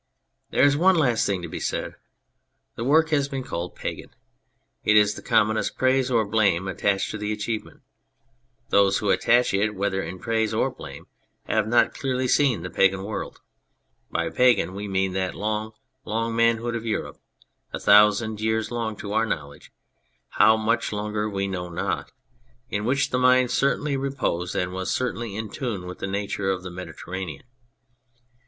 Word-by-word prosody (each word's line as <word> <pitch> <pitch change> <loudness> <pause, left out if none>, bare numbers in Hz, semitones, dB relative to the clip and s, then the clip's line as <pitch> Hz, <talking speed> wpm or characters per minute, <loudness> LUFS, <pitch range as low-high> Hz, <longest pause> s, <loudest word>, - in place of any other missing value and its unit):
There - - +2
is 145 0 +5
one 185 +5 +4
last 125 -9 +2
thing 95 -3 -1
to - - -4
be - - -6
said: - - -3 0.8
the 115 - -4
work 160 +5 +4
has 140 -2 +1
been 135 -2 -4
called 90 -8 -5
pagan. - - -6 0.7
It 105 - +4
is 105 -1 +4
the - - -9
commonest 110 +1 +1
praise 130 0 +2
or 115 -3 +2
blame 100 -4 +1
attached 95 +1 0
to 110 - -5
the 105 0 -2
achievement. 105 +1 -4 0.9
Those 100 -2 +4
who 105 -2 0
attach 120 -1 +3
it, 105 +2 +1
whether 95 0 -1
in 90 +2 -6
praise 110 +1 -1
or - - +1
blame, - - -10 0.4
have 110 -1 0
not 120 +1 +3
clearly 130 -1 -1
seen 125 - +2
the 90 - -6
pagan 95 +2 +2
world. 105 +2 -6 0.7
By - - -2
pagan 125 -7 +3
we 100 +1 -5
mean 95 -1 0
that 95 -1 -2
long, 110 +1 -3 0.3
long 115 0 -2
manhood 115 +1 +2
of 115 - -4
Europe 110 -2 -3 0.5
(a - - -4
thousand 105 +1 +4
years 110 +1 0
long 115 -2 -2
to 100 0 -6
our 110 +1 +2
knowledge 70 -8 -6 0.6
how 110 +1 +5
much 110 +2 0
longer 105 0 -2
we 100 -1 -2
know 90 -2 -4
not) 85 - -3 0.6
in 105 +1 -2
which 130 +2 +1
the 125 - +1
mind 125 -1 +4
certainly 140 +1 +1
reposed 135 -10 -2
and 90 0 -1
was 95 0 -3
certainly 120 -4 -2
in 110 0 -5
tune 115 -10 -4
with 90 0 -8
the - - -3
nature 100 0 -2
of 95 -1 -1
the 90 - -7
Mediter 90 -2 -9
ranean. 95 -6 -5
110 Hz, 175 wpm, -24 LUFS, 95-120 Hz, 0.9 s, is